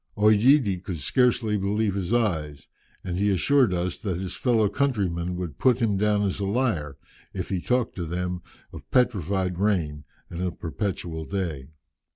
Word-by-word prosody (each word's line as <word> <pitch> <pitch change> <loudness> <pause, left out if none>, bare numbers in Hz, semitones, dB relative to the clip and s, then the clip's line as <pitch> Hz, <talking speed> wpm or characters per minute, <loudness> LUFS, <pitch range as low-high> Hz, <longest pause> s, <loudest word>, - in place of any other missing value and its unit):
OEdidi 105 -1 +4
could 90 -4 -4
scarcely 115 - +2
believe 100 +1 0
his 95 0 -3
eyes, 80 -12 -1 0.4
and 90 0 -3
he 100 +1 +2
assured 125 - +3
us 90 0 -2
that 95 -5 -2
his 95 -1 -5
fellow 115 -4 +2
countrymen 95 -10 -1
would 90 -5 -5
put 125 -2 +3
him 110 -4 +1
down 105 +1 +2
as 100 0 -1
a 100 - -1
liar, 95 - -1 0.4
if - - -4
he 95 -2 -1
talked 125 +2 0
to 85 - -2
them 90 +1 -3 0.3
of - - -11
petrified 95 - +1
rain, 85 -8 0 0.2
and 85 +1 -6
of 90 -2 -3
perpetual 85 -2 -3
day." 80 -8 -3
95 Hz, 165 wpm, -25 LUFS, 85-110 Hz, 0.4 s, OEdidi